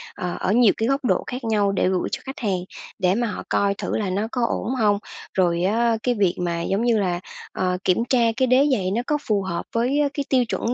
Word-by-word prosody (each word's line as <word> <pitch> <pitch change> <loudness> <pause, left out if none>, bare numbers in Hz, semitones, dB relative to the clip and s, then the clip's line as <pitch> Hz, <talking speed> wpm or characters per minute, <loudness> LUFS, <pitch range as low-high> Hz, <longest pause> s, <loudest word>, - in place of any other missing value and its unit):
ờ, 180 -1 -4
ở 190 - 0
nhiều 235 -1 +5
cái 225 - 0
góc 275 -1 0
độ - - +2
khác 250 0 -5
nhau 210 -3 +1
để 190 - +1
gửi 185 -1 -1
cho - - -3
khách 270 - -7
hàng, 195 -6 0 0.4
để 185 +1 +2
mà 240 0 0
họ - - -5
coi 200 0 +2
thử - - -3
là 205 -3 -1
nó 205 +4 -1
có 250 - -2
ổn 250 +2 -2
hông. 210 -4 +3 0.4
Rồi 175 -2 +1
á 225 +3 +2
cái 245 -1 +1
việc 190 -4 +2
mà, 170 -1 -1
giống 195 +6 0
như 230 -2 +3
là, 180 -3 0 0.3
ờ, 180 -1 -1
kiểm 180 - +2
tra 255 - +3 0.2
cái 260 - +2
đế 265 +4 +4
giày 190 -7 0
nó 230 +4 0
có 300 - +1
phù 210 -2 +2
hợp 185 -3 -4
với 255 +6 +2
cái 285 - -3
tiêu 255 -2 +3
chuẩn 230 +2 -2
215 Hz, 250 wpm, -23 LUFS, 185-245 Hz, 0.4 s, nhiều